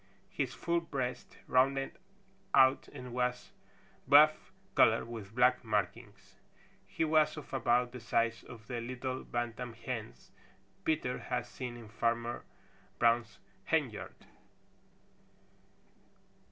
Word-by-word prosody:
His - - -2
full 170 0 0
breast 130 -6 -4
rounded 135 +1 +2 0.6
out 130 +1 +5
and 125 -1 -9
was 125 0 -1 0.6
buff 150 +3 +6 0.2
color - - +5
with 110 -3 -8
black 125 +1 +4
markings. 105 0 -3 0.5
He 160 - -1
was 155 0 +3
of 150 - -9
about 125 -2 +2
the 125 - -8
size 115 -1 0
of 115 -3 -11
the 120 -1 -4
little 130 +2 -4
Bantam 120 0 -4
hens 115 -1 -7 0.5
Peter 150 -6 0
had 125 -1 -2
seen 125 0 -7
in 115 -2 -11
Farmer 115 +2 -1 0.5
Brown's 115 -3 +2 0.3
henyard. - - -1
125 Hz, 110 wpm, -33 LUFS, 115-130 Hz, 0.6 s, buff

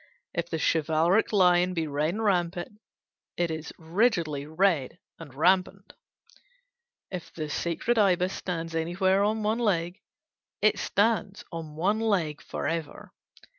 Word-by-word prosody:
If 170 0 -3
the 165 - -2
chivalric 160 +6 +2
lion 180 -2 +4
be 165 -1 0
red 150 +4 -1
and 225 - -3
rampant, 180 0 -1 0.6
it 175 -1 0
is 160 0 -5
rigidly 165 - 0
red 160 -3 +1 0.2
and 160 -4 -10
rampant; 185 +6 +1 1.2
if 180 -3 -6
the 155 -2 -5
sacred 175 +10 0
ibis 185 -2 +3
stands 165 -2 -4
anywhere 185 +4 +1
on 215 +1 0
one 215 +3 +1
leg, 180 -4 0 0.6
it - - +3
stands 205 -2 0
on 160 -3 -7
one 195 +7 +1
leg 185 -10 0
for - - -4
ever. 160 -1 -5
175 Hz, 130 wpm, -27 LUFS, 160-195 Hz, 1.2 s, lion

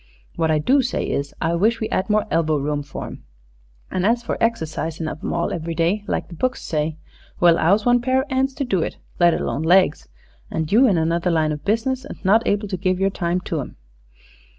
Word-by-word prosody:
"What 160 - 0
I 155 - +3
do 265 - +3
say 245 -1 -2
is, 140 0 -2
I 165 +1 0
wish 220 +7 +2
we 220 - -1
'ad 185 - -1
more 210 0 +2
elbow 160 -2 +2
room 145 +1 -1
for 140 - -7
'em. - - -10 0.7
An' 185 - -1
as 235 +4 +2
for - - -2
exercisin' 165 -7 -1
of 155 - -6
'em - - -2
all 170 - -1
every 165 0 -4
day, 175 +6 +1
like - - -2
the - - -12
books 255 +9 -2
say 155 0 -2 0.4
well, 170 -1 +6
'ow's 200 +6 +3
one 245 0 +4
pair 260 +2 +2
of 290 - -15
'ands 265 +1 0
to 285 - -2
do 195 -8 0
it, - - -3 0.2
let 175 -1 +5
alone 145 - -2
legs, 175 0 +3 0.4
and 160 -1 -3
you 245 +6 +6
in 195 -6 +3
another 165 +2 +1
line 160 -2 +2
of 150 -1 -5
business 245 +5 0
and 285 - -9
not 220 +4 +4
able 205 +1 0
to 185 - -2
give 185 0 0
yer 195 0 +2
time 175 -1 -1
to 165 -3 -3
'em?" - - -9
180 Hz, 225 wpm, -21 LUFS, 160-230 Hz, 0.7 s, well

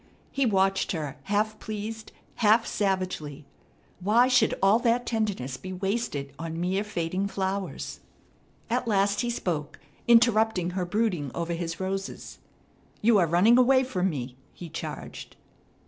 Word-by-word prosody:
He 275 -2 +1
watched 195 -2 +2
her, 150 -5 -4
half 210 +2 0
pleased, 215 +1 -6 0.3
half 225 +1 +4
savagely. 185 -8 -2 0.5
Why 220 +7 +4
should 250 -3 +3
all 195 +4 +4
that 240 0 +1
tenderness 200 - -2
be 185 +5 -7
wasted 185 -8 -2
on 165 0 -5
mere 185 +3 0
fading 185 -1 -2
flowers? 195 -1 -3 0.7
At 240 +1 -1
last 200 -1 +2
he 240 - -1
spoke, 160 -10 -3 0.3
interrupting 220 -6 +4
her 180 0 -2
brooding 180 -7 0
over 170 0 -2
his 165 -1 -4
roses. 195 +1 -5 0.6
"You 220 -2 +5
are 175 - +3
running 195 +9 +5
away 260 +1 +5
from 190 -8 0
me!" 130 -5 -5 0.2
he 175 - -9
charged. - - -7
195 Hz, 135 wpm, -27 LUFS, 175-220 Hz, 0.7 s, You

